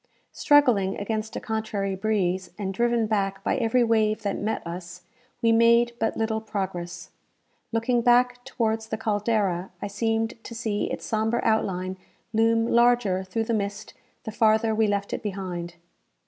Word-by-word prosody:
Struggling 245 -10 +3
against 220 +1 -3
a - - -2
contrary 215 -3 -2
breeze, 190 -3 0
and 195 -2 -3
driven 235 +2 +1
back 195 -2 -1
by - - +1
every 245 0 +2
wave 220 -2 +1
that 200 -1 -1
met 215 -2 -2
us, 180 +1 -7 0.4
we 230 - +5
made 235 +1 +4
but 225 - -1
little 220 0 -1
progress. 185 -5 -5 0.6
Looking 235 +1 +1
back 245 +1 +3
towards 225 -4 -1
the - - -3
"Caldera," 205 -4 0
I - - -4
seemed 225 +3 -2
to 230 - -8
see 220 -3 -1
its - - -5
sombre 220 +2 0
outline 190 -4 0 0.4
loom 225 +1 +3
larger 235 -6 +3
through 190 +4 -2
the 230 - -2
mist 205 0 -3 0.3
the 220 - -5
farther 220 0 +3
we 220 0 +2
left 200 -1 -1
it - - -3
behind. 180 -4 -5
220 Hz, 155 wpm, -25 LUFS, 195-230 Hz, 0.6 s, we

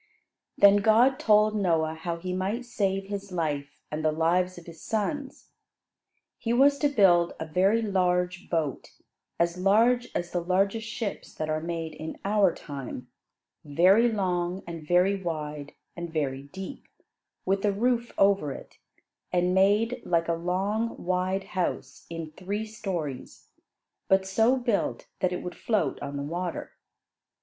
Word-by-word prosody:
Then 200 0 +7
God 225 +6 +4
told 215 0 +4
Noah 165 -6 +1
how 170 +1 -4
he 180 +2 -4
might 200 +7 -2
save 195 -4 -1
his 200 0 -6
life 150 -5 -2 0.2
and 155 +1 -3
the 155 - +3
lives 175 +3 +1
of 175 - -11
his 165 -2 -12
sons. 265 +6 -3 0.9
He 230 - -2
was 280 +3 +5
to 290 - +3
build 185 -9 +4
a 160 - -3
very 190 +8 +2
large 180 -2 0
boat, 160 -5 -2 0.5
as 170 +1 +1
large 230 +6 +3
as 175 0 -2
the 175 - -1
largest 195 +5 0
ships 220 -2 -5
that 155 0 -3
are 155 0 -1
made 165 -1 -4
in 155 +1 -7
our 200 -2 +4
time; 135 -5 -8 0.5
very 185 +11 +4
long, 180 -3 -1
and 165 -3 -8
very 185 +3 +3
wide 150 -4 -5 0.2
and 170 -1 -6
very 140 -4 -1
deep; 190 - -9 0.6
with 195 +1 +1
a 205 - +3
roof 235 +3 0
over 195 -7 +3
it; - - -10 0.5
and 180 0 +2
made 205 +5 +3
like 170 -1 +1
a 170 - +1
long, 195 +7 -1
wide 185 +2 -1
house 170 -8 -4
in 165 -2 -6
three 200 +6 -4
stories; 185 - -5 0.6
but 190 0 +3
so 225 +7 +3
built 240 -5 -1
that 185 - +1
it 180 - -4
would 180 - -5
float 215 -3 -1
on 140 0 -5
the 140 - -3
water. 175 +4 -4
185 Hz, 150 wpm, -27 LUFS, 165-205 Hz, 0.9 s, Then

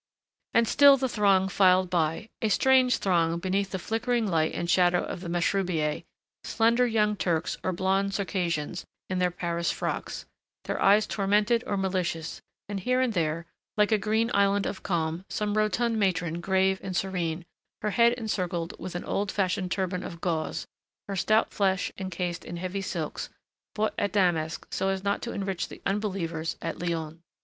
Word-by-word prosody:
And 230 0 +5
still 280 +2 +7
the 260 0 0
throng 200 -5 +3
filed 185 -2 +4
by, 165 +3 0
a 220 - +1
strange 255 +2 +4
throng 170 -3 +1
beneath 190 +2 -1
the 190 - -3
flickering 225 +4 -1
light 160 -5 +1
and 170 - -2
shadow 180 0 +3
of - - -5
the 180 - -6
mashrubiyeh, 170 -3 0 0.4
slender 235 +2 +3
young 210 -2 +2
Turks 170 -4 -1
or 185 - 0
blonde 195 +2 0
Circassians 175 -4 -2 0.3
in 185 - 0
their 180 0 +3
Paris 170 -1 -2
frocks, - - -3 0.4
their - - -3
eyes 205 +2 +5
tormented 210 +4 +1
or 200 - -1
malicious, 180 -4 -2 0.3
and 200 -1 -3
here 255 +7 +1
and 255 -3 +1
there, 165 -2 -1 0.3
like 210 +1 +3
a 215 - +4
green 220 +3 +1
island 200 0 +3
of 190 - -4
calm, 165 -1 -1
some 210 -1 -1
rotund 220 +2 +1
matron 175 -4 0
grave 190 +1 +2
and 185 -2 -3
serene, 175 -3 -2 0.4
her 210 - 0
head 235 +2 +4
encircled 180 -8 -2
with 180 0 -6
an 175 - -3
old 200 0 -1
fashioned 185 -1 0
turban 185 0 -1
of 170 -2 -7
gauze, 165 -3 -2 0.4
her 200 - -3
stout 215 +4 +2
flesh 190 -2 +1
encased 180 -2 -3
in 175 - -7
heavy 185 +3 -3
silks, 195 - -4 0.5
bought 215 0 0
at 200 -2 -1
Damask 170 -5 +1
so 195 - 0
as 190 0 -2
not 200 0 0
to 235 - -4
enrich 195 -2 -3
the - - -11
Unbelievers 185 -6 -2
at 165 - -4
Lyons. 165 -2 -3
190 Hz, 170 wpm, -27 LUFS, 175-210 Hz, 0.5 s, still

